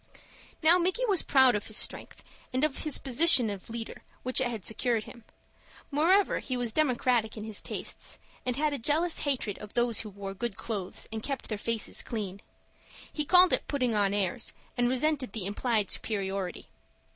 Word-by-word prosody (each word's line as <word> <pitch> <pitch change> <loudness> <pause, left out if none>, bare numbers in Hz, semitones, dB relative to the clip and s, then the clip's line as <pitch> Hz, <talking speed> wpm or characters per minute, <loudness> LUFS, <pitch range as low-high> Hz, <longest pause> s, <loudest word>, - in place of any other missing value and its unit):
Now 335 +3 +7
Micky 375 +8 +1
was 395 -7 +4
proud 265 -3 +5
of 210 - -2
his 215 - -3
strength, - - -1 0.3
and 255 +3 0
of 305 -3 0
the 305 - 0
position 265 -3 +5
of 200 +1 -8
leader 225 0 -6 0.2
which 255 +1 +1
it 260 - +2
had 225 -6 -5
secured 230 0 0
him. 235 -1 -13 0.7
Moreover 355 +8 +3
he 255 -2 -3
was 240 -2 +1
democratic 245 -6 +1
in 215 - -5
his 215 -1 -4
tastes, - - -7 0.3
and 250 -1 -1
had 300 +1 0
a 285 - -3
jealous 315 +8 +1
hatred 255 -8 -2
of 210 -1 -11
those 240 -2 +3
who 215 - -4
wore 195 -1 -7
good 225 0 -4
clothes 200 -5 -4
and 220 0 -4
kept 275 +3 -4
their 215 - -2
faces 230 -1 -1
clean. 200 -4 -5 0.7
He 300 - -2
called 360 +3 +6
it - - +1
putting 255 -5 0
on 205 -2 +2
airs, 205 +3 0 0.2
and 245 -1 +2
resented 260 -3 0
the 215 -5 -3
implied 210 +1 0
superiority. 195 -3 -3
240 Hz, 180 wpm, -29 LUFS, 210-285 Hz, 0.7 s, Now